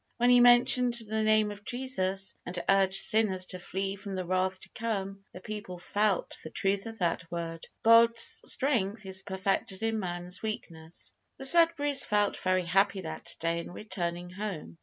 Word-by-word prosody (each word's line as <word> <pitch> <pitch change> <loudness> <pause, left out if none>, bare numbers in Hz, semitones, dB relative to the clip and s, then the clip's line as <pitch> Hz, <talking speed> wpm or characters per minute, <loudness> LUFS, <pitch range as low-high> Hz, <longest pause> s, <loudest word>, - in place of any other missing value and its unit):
When 245 +1 +3
he 245 - +6
mentioned 245 0 +5
the 220 -2 0
name 215 -1 +2
of 205 0 -10
Jesus, 195 -7 -2
and 180 - -6
urged 195 -1 +3
sinners 200 -4 +1
to 185 - -3
flee 195 +2 -4
from 200 -1 -7
the 185 -1 -4
wrath 185 +1 0
to 190 - -8
come, 195 -3 -4
the 180 - -11
people 205 -3 -7
felt 205 +2 0
the 160 - -7
truth 195 +4 -1
of 225 0 -8
that 170 -2 -2
word, 165 -1 -5 0.2
"God's 230 0 +5
strength 220 -6 0
is 190 0 -1
perfected 190 +1 -2
in 225 -1 0
man's 175 -1 -4
weakness." 165 -7 -7 0.2
The 270 - -6
Sudberrys 310 -3 +5
felt 205 -1 +1
very 185 -1 0
happy 195 +3 +2
that 160 -2 -5
day 165 0 -1
on 170 - -7
returning 175 -3 -5
home. 185 -4 -6
195 Hz, 170 wpm, -29 LUFS, 185-220 Hz, 0.2 s, he